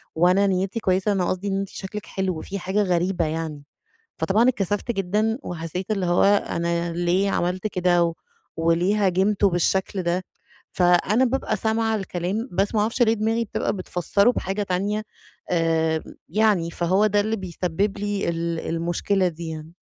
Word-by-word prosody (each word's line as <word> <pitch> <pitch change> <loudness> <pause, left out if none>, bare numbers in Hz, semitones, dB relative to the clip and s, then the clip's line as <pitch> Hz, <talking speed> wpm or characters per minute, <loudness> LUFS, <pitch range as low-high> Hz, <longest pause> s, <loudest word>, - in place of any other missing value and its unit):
وأنا 180 +4 +4
نيّتي 190 +3 0
كويسة، 190 0 +1
أنا 190 -3 +1
قصدي 185 +2 -2
إن 195 0 0
أنتِ 195 - -3
شكلِك 205 +2 -6
حلو 185 -4 -2
في 200 0 -5
حاجة 195 +3 0
غريبة 180 -1 +1
يعني"، 155 -2 -4 0.6
فطبعًا 220 +5 +3
اتكسفت 205 -1 0
جدًا، 210 +4 0
وحسّيت 175 +3 -5
اللي 190 -4 -1
هو 175 0 +3
أنا 170 -4 +1
ليه 175 +3 +1
عملت 180 +2 -1
كده، 180 -2 +2
و 170 -1 -1 0.4
وليه 175 +5 +2
هاجمته 195 +2 +2
بالشكل 185 +2 0
ده؟ 175 +2 0 0.5
فأنا 180 +7 +3
بابقى 240 -3 -1
سامعة 220 +1 0
الكلام، 195 +4 -3
بس 195 +5 0
ما 210 - +3
اعرفش 230 +3 +1
ليه 225 -1 +4
دماغي 225 +2 0
بتبقى 210 - -2
بتفسره 195 +3 +1
بحاجة 195 -2 -2
تانية، 200 +3 -1 0.5
آآ، 160 -2 +1 0.3
يعني 200 -3 +2
فهو 185 +5 +2
ده 205 0 +2
اللي 220 +2 -1
بيسبب 190 +1 -2
لي 205 -2 -2
ال 170 0 -2
المشكلة 175 +3 0
دي 170 0 -7
يعني. 160 0 -7
190 Hz, 155 wpm, -23 LUFS, 175-205 Hz, 0.6 s, وأنا